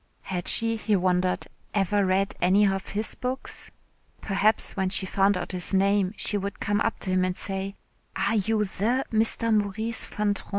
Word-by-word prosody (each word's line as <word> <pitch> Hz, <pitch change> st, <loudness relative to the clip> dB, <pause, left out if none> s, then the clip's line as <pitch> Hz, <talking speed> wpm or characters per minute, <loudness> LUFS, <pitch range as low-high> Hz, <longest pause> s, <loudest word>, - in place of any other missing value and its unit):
Had 180 Hz, -2 st, -4 dB
she, 230 Hz, 0 st, +1 dB
he 215 Hz, -1 st, +1 dB
wondered, 180 Hz, -1 st, +1 dB, 0.3 s
ever 200 Hz, 0 st, +2 dB
read 190 Hz, +1 st, +1 dB
any 190 Hz, +4 st, +5 dB
of 195 Hz, -1 st, -1 dB
his 210 Hz, +2 st, -2 dB
books? 255 Hz, +1 st, -5 dB, 0.5 s
Perhaps 210 Hz, +2 st, +1 dB
when 190 Hz, -2 st, 0 dB
she 190 Hz, 0 st, -2 dB
found 195 Hz, +1 st, +2 dB
out 175 Hz, -, -4 dB
his 185 Hz, +1 st, -1 dB
name 195 Hz, 0 st, +2 dB
she 205 Hz, -, 0 dB
would 200 Hz, +1 st, -5 dB
come 205 Hz, +1 st, 0 dB
up 230 Hz, -, 0 dB
to 190 Hz, -, -2 dB
him 185 Hz, 0 st, +2 dB
and 185 Hz, 0 st, -1 dB
say: 195 Hz, 0 st, -4 dB, 0.4 s
"Are -, -, 0 dB
you 215 Hz, +1 st, +1 dB
the 230 Hz, +7 st, 0 dB
Mr. 225 Hz, +1 st, +3 dB
Maurice 215 Hz, +2 st, 0 dB
Van 210 Hz, -1 st, 0 dB
Trean?" -, -, -10 dB
200 Hz, 180 wpm, -26 LUFS, 190-215 Hz, 0.5 s, any